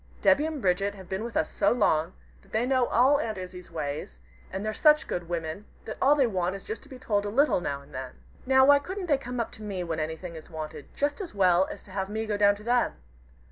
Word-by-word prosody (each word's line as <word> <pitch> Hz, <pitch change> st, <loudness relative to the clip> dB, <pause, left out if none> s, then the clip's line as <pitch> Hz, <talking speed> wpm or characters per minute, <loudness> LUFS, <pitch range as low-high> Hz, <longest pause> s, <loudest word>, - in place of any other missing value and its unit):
Debby 290 Hz, +2 st, +5 dB
and 310 Hz, -5 st, -5 dB
Bridget 195 Hz, +2 st, +1 dB
have 190 Hz, -2 st, -11 dB
been 190 Hz, +4 st, -3 dB
with 235 Hz, 0 st, -4 dB
us -, -, 0 dB
so -, -, +2 dB
long, 175 Hz, -7 st, +2 dB, 0.3 s
that -, -, -24 dB
they 220 Hz, +3 st, +1 dB
know 255 Hz, -2 st, +2 dB
all 265 Hz, +5 st, +4 dB
Aunt 220 Hz, -7 st, -3 dB
Izzie's 180 Hz, -1 st, -8 dB
ways, 145 Hz, -, -5 dB, 0.3 s
and 190 Hz, +2 st, -4 dB
they're 215 Hz, -, -1 dB
such 300 Hz, +6 st, +5 dB
good 175 Hz, -1 st, -4 dB
women, 165 Hz, +3 st, -4 dB, 0.2 s
that 220 Hz, -, -6 dB
all 280 Hz, +2 st, +6 dB
they 275 Hz, -3 st, +4 dB
want 185 Hz, -4 st, -1 dB
is 195 Hz, -, -8 dB
just 440 Hz, -, -5 dB
to 285 Hz, -, -17 dB
be 260 Hz, -, -9 dB
told 205 Hz, -5 st, 0 dB
a 205 Hz, -, -3 dB
little 270 Hz, -3 st, +3 dB
now 140 Hz, -4 st, -3 dB
and -, -, -19 dB
then. 130 Hz, 0 st, -6 dB, 0.3 s
Now, 265 Hz, 0 st, +6 dB
why 285 Hz, +1 st, +7 dB
couldn't 375 Hz, +6 st, -5 dB
they 290 Hz, -5 st, +2 dB
come 250 Hz, -1 st, -5 dB
up 230 Hz, -, -2 dB
to -, -, -12 dB
me 200 Hz, -4 st, -3 dB
when 165 Hz, -2 st, -3 dB
anything 160 Hz, +3 st, -4 dB
is 160 Hz, -, -10 dB
wanted 155 Hz, -3 st, -7 dB
just 290 Hz, +7 st, -1 dB
as 360 Hz, -, -7 dB
well 185 Hz, -1 st, +4 dB
as -, -, -8 dB
to 200 Hz, -, -16 dB
have 190 Hz, 0 st, -3 dB
me 220 Hz, +1 st, -2 dB
go 215 Hz, -1 st, -1 dB
down 205 Hz, 0 st, +4 dB
to 205 Hz, -, -13 dB
them? 240 Hz, +1 st, +1 dB
205 Hz, 260 wpm, -27 LUFS, 175-260 Hz, 0.3 s, why